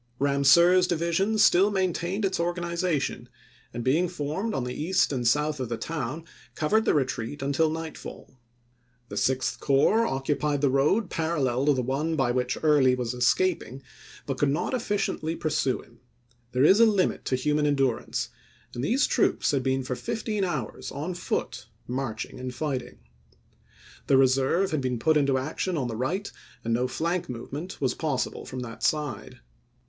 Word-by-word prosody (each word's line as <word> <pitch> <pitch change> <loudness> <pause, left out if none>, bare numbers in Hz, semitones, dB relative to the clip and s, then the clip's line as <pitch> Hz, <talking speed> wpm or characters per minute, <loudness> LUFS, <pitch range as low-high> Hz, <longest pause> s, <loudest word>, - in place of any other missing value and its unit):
Eamseur's 140 +7 +5
division 175 +5 0
still 200 -2 +5
maintained 190 0 -1
its 190 - -1
organiza 170 -1 0
tion, - - -5 0.4
and 120 0 -5
being 155 +9 +2
formed 170 +6 -3
on 135 - -1
the 125 0 -4
east 170 +2 +1
and 125 -3 -1
south 150 +4 +1
of 130 -3 -3
the 115 - -2
town 150 +3 -4 0.3
covered 215 +9 +1
the - - +3
retreat 130 -1 -2
until 140 +3 +2
nightfall. 160 -3 -7 0.8
The - - -6
Sixth 130 0 0
Corps 200 +12 +3
occupied 145 +2 -1
the 140 -2 +3
road 155 - +2
parallel 145 -5 0
to 145 - +6
the 130 - -1
one 145 +6 -1
by 135 -5 +1
which 125 0 -1
Early 145 -5 +4
was 125 -1 -3
escaping 135 +1 0 0.4
but 135 -2 -3
could 145 - +3
not 145 - -1
efficiently 205 -8 -1
pursue 145 -5 -1
him. 120 - -22 0.5
There 125 +1 +2
is 195 +6 +6
a 230 - +8
limit 200 -4 +1
to 130 - +1
human 150 +3 +1
endurance, 135 -4 0 0.4
and 120 - -4
these 250 - +2
troops - - +1
had 140 -2 +1
been 130 0 0
for 125 0 -3
fifteen 210 - -3
hours 150 - -3
on 155 +6 -4
foot, 130 -9 -3 0.2
marching 125 -3 -4
and 130 0 -4
fighting. 130 -2 -4 1.1
The 135 - +5
reserve 135 +8 +3
had 155 -3 0
been 130 -1 -1
put 155 +7 +2
into 140 -3 +3
action 155 +6 -2
on 130 -4 -1
the 115 - -4
right 175 - -2 0.3
and 115 - -1
no 125 +2 +1
flank 170 +6 -2
movement 140 +9 -6
was 130 -3 +1
possible 145 -6 -3
from 130 - -5
that 115 -2 -8
side. 145 -9 -2
145 Hz, 165 wpm, -26 LUFS, 130-170 Hz, 1.1 s, a